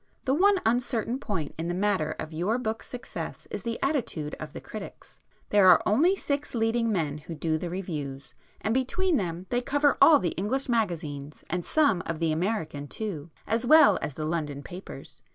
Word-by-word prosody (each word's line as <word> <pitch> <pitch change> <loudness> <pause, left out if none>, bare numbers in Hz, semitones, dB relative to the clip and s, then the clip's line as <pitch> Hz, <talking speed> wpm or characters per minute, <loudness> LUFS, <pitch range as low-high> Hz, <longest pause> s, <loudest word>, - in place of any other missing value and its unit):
The 265 - +2
one 390 +5 +4
uncertain 240 +1 0
point 185 - -3
in 165 - -2
the 175 - -1
matter 185 -5 0
of 160 0 -6
your 180 +9 0
book's 225 -3 -4
success 250 0 -7
is - - -4
the 230 -1 -3
attitude 235 - -1
of 155 -1 -7
the - - -7
critics. 215 -2 -10 0.3
There 205 -2 +6
are 180 - +8
only 320 - +4
six 285 -7 -3
leading 225 0 +1
men 155 -7 -1
who 165 +2 -8
do 155 +1 -1
the 175 - -4
reviews, 150 -7 -5 0.3
and 220 - 0
between 300 +7 +1
them 175 -2 -3
they 245 0 +1
cover 285 +2 +2
all 315 - +9
the 180 - 0
English 210 - -2
magazines 160 - -2
and 180 0 -1
some 280 - +2
of 165 - -2
the 165 -1 +1
American 155 -4 -2
too, 170 -5 -5 0.2
as 225 +2 0
well 250 -6 +7
as 140 - -4
the 155 - -3
London 150 -3 -3
papers. 180 +5 -10
200 Hz, 190 wpm, -27 LUFS, 160-245 Hz, 0.3 s, all